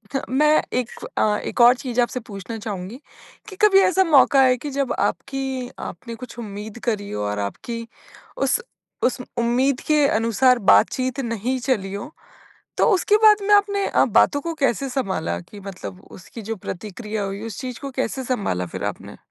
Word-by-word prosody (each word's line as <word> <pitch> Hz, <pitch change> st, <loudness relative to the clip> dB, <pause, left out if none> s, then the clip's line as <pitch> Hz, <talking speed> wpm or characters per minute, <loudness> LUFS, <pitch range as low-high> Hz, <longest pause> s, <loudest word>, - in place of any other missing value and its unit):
ह -, -, +1 dB
मैं 300 Hz, +4 st, +4 dB
एक 250 Hz, -1 st, 0 dB, 0.3 s
अ, 210 Hz, -1 st, +2 dB
एक -, -, -2 dB
और 240 Hz, +1 st, +8 dB
चीज़ 250 Hz, -1 st, -4 dB
आपसे 245 Hz, +1 st, -1 dB
पूछना 220 Hz, -1 st, -8 dB
चाहूँगी, 205 Hz, 0 st, -6 dB, 0.5 s
कि 385 Hz, -, -10 dB
कभी 405 Hz, -2 st, +6 dB
ऐसा 380 Hz, 0 st, +4 dB
मौक़ा 280 Hz, -4 st, +5 dB
आया 255 Hz, -1 st, +5 dB
कि 295 Hz, -, -3 dB
जब 275 Hz, -2 st, 0 dB
आपकी 265 Hz, -2 st, -2 dB
आपने 235 Hz, -1 st, -7 dB
कुछ 240 Hz, -1 st, -10 dB
उम्मीद 210 Hz, +1 st, -7 dB
करी 205 Hz, -3 st, -3 dB
हो 105 Hz, 0 st, -3 dB
और 105 Hz, 0 st, -2 dB
आपकी 230 Hz, -, -5 dB, 0.6 s
उस -, -, +2 dB, 0.4 s
उस 250 Hz, -, +1 dB, 0.2 s
उम्मीद 245 Hz, +3 st, +2 dB
के 300 Hz, -2 st, +4 dB
अनुसार 240 Hz, +2 st, +3 dB
बातचीत 255 Hz, +3 st, +2 dB
नहीं 240 Hz, 0 st, -2 dB
चली 210 Hz, -6 st, -1 dB
हो? 200 Hz, +9 st, -6 dB, 0.7 s
तो -, -, +4 dB
उसके 400 Hz, +2 st, +3 dB
बाद 425 Hz, -1 st, +7 dB
में 415 Hz, +1 st, +4 dB
आपने 400 Hz, -1 st, +2 dB
अ, -, -, +3 dB
बातों 285 Hz, -, +3 dB
को 335 Hz, +2 st, -4 dB
कैसे 275 Hz, -2 st, 0 dB
सँभाला 190 Hz, -, -2 dB
कि 205 Hz, -, -13 dB
मतलब 190 Hz, -1 st, -8 dB
उसकी 220 Hz, +5 st, -11 dB
जो 220 Hz, +2 st, -4 dB
प्रतिक्रिया 210 Hz, +3 st, -5 dB
हुई, 195 Hz, +1 st, -4 dB
उस 220 Hz, -4 st, -7 dB
चीज़ 255 Hz, -3 st, -6 dB
को 275 Hz, -1 st, -5 dB
कैसे 260 Hz, 0 st, -3 dB
सँभाला 200 Hz, -, -1 dB
फिर 85 Hz, -, -6 dB
आपने? -, -, -5 dB
240 Hz, 175 wpm, -22 LUFS, 210-270 Hz, 0.7 s, और